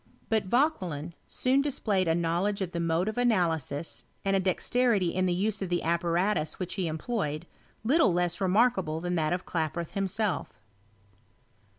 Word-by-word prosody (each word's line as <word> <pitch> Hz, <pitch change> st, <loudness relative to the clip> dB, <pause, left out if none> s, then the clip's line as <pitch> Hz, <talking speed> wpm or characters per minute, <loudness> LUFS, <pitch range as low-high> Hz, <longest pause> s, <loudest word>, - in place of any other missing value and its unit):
But 220 Hz, -3 st, +1 dB
Vauquelin 185 Hz, -, 0 dB
soon 260 Hz, +2 st, +2 dB
displayed 210 Hz, -10 st, 0 dB
a 165 Hz, -, +3 dB
knowledge 175 Hz, +4 st, 0 dB
of 180 Hz, -, -5 dB
the 170 Hz, -, -3 dB
mode 165 Hz, +2 st, +1 dB
of 220 Hz, +3 st, -2 dB
analysis, 170 Hz, -, 0 dB, 0.2 s
and 195 Hz, 0 st, +2 dB
a -, -, +3 dB
dexterity 195 Hz, +1 st, +1 dB
in 185 Hz, 0 st, +1 dB
the -, -, +1 dB
use 200 Hz, +2 st, 0 dB
of 190 Hz, -, -2 dB
the 175 Hz, 0 st, 0 dB
apparatus 170 Hz, 0 st, 0 dB
which 180 Hz, -2 st, -3 dB
he 185 Hz, -4 st, -1 dB
em 160 Hz, 0 st, -2 dB
ployed, 155 Hz, -7 st, -2 dB, 0.4 s
little 265 Hz, -, +4 dB
less 175 Hz, +2 st, 0 dB
remarkable 190 Hz, -5 st, +2 dB
than 175 Hz, +1 st, -2 dB
that 155 Hz, -3 st, +1 dB
of 180 Hz, +1 st, -2 dB
Klaproth 165 Hz, 0 st, -2 dB
himself. 195 Hz, -, -2 dB
185 Hz, 165 wpm, -28 LUFS, 170-210 Hz, 0.4 s, little